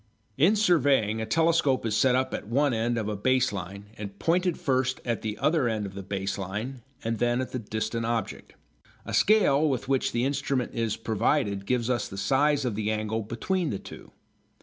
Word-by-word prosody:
In 165 - +4
surveying, 140 - +3
a 110 - -3
telescope 160 -2 +2
is 110 -2 0
set 125 +2 +4
up 130 0 0
at - - -4
one 140 +4 +2
end 115 +1 0
of 110 -2 -2
a 105 - -2
base 130 +3 +2
line 100 +1 -6
and 100 -1 -7
pointed 175 - +1
first 130 -1 0
at 120 -2 -1
the 105 -1 -4
other 150 0 +2
end 110 -2 -2
of 95 - -7
the 100 - -6
base 100 0 -3
line 105 +7 -5 0.2
and 115 -1 -2
then 120 0 +1
at 130 - -3
the 130 - -3
distant 110 +1 -3
object. 115 -3 -3 0.5
A - - -6
scale 155 -8 +4
with 130 -3 -2
which 135 -1 +1
the 120 +1 0
instrument 135 -2 -1
is 115 -2 -1
provided 110 -2 0
gives 125 -2 0
us 120 -4 0
the 95 - -9
size 140 +8 +2
of 120 - -1
the 105 +1 -2
angle 110 +1 -1
between 155 - -2
the 100 - -2
two. - - -11
120 Hz, 200 wpm, -27 LUFS, 105-135 Hz, 0.5 s, In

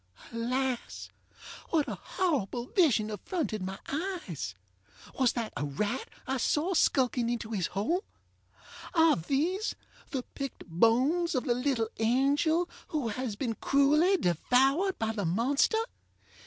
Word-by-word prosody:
Alas! 250 +2 -2 0.6
what 310 -3 +2
a - - -3
horrible 260 - -1
vision 245 - +2
affronted 215 - -3
my 190 +1 -4
eyes? 280 - -4 0.6
Was 255 -3 +4
that 230 -3 -3
a - - -2
rat 205 - -2 0.2
I 265 - -1
saw 310 +8 +1
skulking 250 -7 +2
into 230 -2 -3
his 190 -6 0
hole? 285 - -1 0.9
Are 325 -1 +6
these 315 - -1 0.3
the 265 -5 -3
picked 275 -1 -6
bones 255 - +2
of 255 - +1
the 240 - +2
little 250 -3 0
angel 285 +9 +2 0.2
who 290 -7 -2
has 225 0 -3
been 230 +1 -2
cruelly 300 - +3
devoured 270 - +2
by 225 0 -1
the 215 -2 -3
monster? 240 - +2
255 Hz, 130 wpm, -30 LUFS, 220-310 Hz, 0.9 s, Are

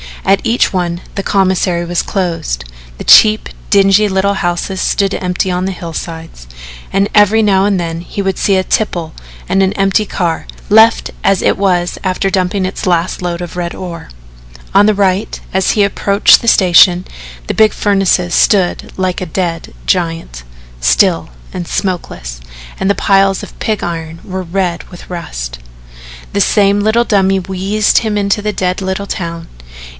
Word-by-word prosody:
At 195 0 +3
each 230 -2 +1
one 175 -1 -2
the 195 - -3
commissary 185 -3 +1
was 175 0 -1
closed, 165 - -3 0.3
the - - -7
cheap, 215 0 +6 0.2
dingy 200 +1 +4
little 200 +1 0
houses 175 +1 -2
stood 195 -1 0
empty 180 0 -2
on 180 +1 -1
the 190 - -2
hillsides, 165 - -8 0.4
and 195 +1 +1
every 210 +1 +4
now 195 -2 +3
and 200 -2 +1
then 165 -1 -4
he 190 +3 -5
would 195 -1 -2
see 200 - +2
a 185 - +1
tipple 175 -6 -2 0.4
and 195 - +2
an 190 0 +1
empty 195 +2 +1
car, 170 -5 -2 0.2
left 220 +2 +4
as 195 -1 +2
it - - +2
was 180 -3 0
after 190 +1 0
dumping 185 +1 0
its 185 0 -4
last 175 0 0
load 175 -1 -3
of 175 -1 -7
red 175 -1 -4
ore. 170 -3 -8 0.6
On 200 +1 +5
the 215 - +3
right, 195 0 0
as 190 -1 +2
he 210 - +2
approached 200 0 +3
the 230 - -6
station, 180 -2 +5 0.4
the - - -1
big 220 -1 +3
furnace 195 -3 +2
stood 190 -4 +1
like 185 -1 -2
a - - -2
dead 165 -1 -4
giant, 165 - -2 0.4
still 165 - +2 0.2
and 180 -2 -5
smokeless, 65 - -4 0.4
and 190 - 0
the 200 - +2
piles 195 -1 +2
of - - -11
pig 215 -2 -2
iron 165 -1 -5
were 190 -1 -5
red 180 -1 -2
with 175 - -13
rust. - - -6 0.7
The 200 - +1
same 200 0 +3
little 220 +3 +2
dummy 195 -3 +2
wheezed 195 +3 +1
him 215 -2 -2
into 200 0 0
the 210 0 -2
dead 185 0 -2
little 190 +1 -3
town. 170 -3 -5
190 Hz, 165 wpm, -14 LUFS, 175-200 Hz, 0.7 s, cheap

